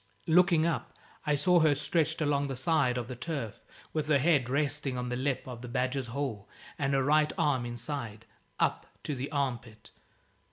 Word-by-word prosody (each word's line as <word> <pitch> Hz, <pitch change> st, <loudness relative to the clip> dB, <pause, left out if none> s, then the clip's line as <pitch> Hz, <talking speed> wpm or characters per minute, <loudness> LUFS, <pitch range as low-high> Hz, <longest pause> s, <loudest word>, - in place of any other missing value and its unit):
Looking 170 Hz, -1 st, +4 dB
up, 170 Hz, -, -2 dB, 0.3 s
I 150 Hz, -, +3 dB
saw 175 Hz, +5 st, +4 dB
her 155 Hz, -3 st, +4 dB
stretched 155 Hz, +2 st, 0 dB
along 145 Hz, -1 st, +1 dB
the 135 Hz, -, -4 dB
side 130 Hz, -2 st, +2 dB
of 120 Hz, -2 st, -3 dB
the 125 Hz, -, -6 dB
turf, 125 Hz, -4 st, -5 dB, 0.3 s
with 155 Hz, -1 st, -1 dB
her 155 Hz, -2 st, +4 dB
head 140 Hz, -4 st, +2 dB
resting 140 Hz, -1 st, -1 dB
on 125 Hz, 0 st, -3 dB
the 125 Hz, -, -1 dB
lip 130 Hz, +1 st, -1 dB
of 125 Hz, -2 st, -7 dB
the 125 Hz, -, -7 dB
badger's 125 Hz, +1 st, -1 dB
hole 115 Hz, -6 st, -4 dB, 0.3 s
and 135 Hz, -1 st, +1 dB
her 135 Hz, -, +2 dB
right 150 Hz, +2 st, +3 dB
arm 130 Hz, -5 st, +1 dB
inside, 120 Hz, -2 st, -5 dB, 0.3 s
up -, -, +1 dB, 0.2 s
to 150 Hz, -, -2 dB
the 135 Hz, +2 st, -4 dB
arm 135 Hz, -5 st, 0 dB
pit. 110 Hz, -1 st, -17 dB
140 Hz, 190 wpm, -30 LUFS, 125-150 Hz, 0.3 s, Looking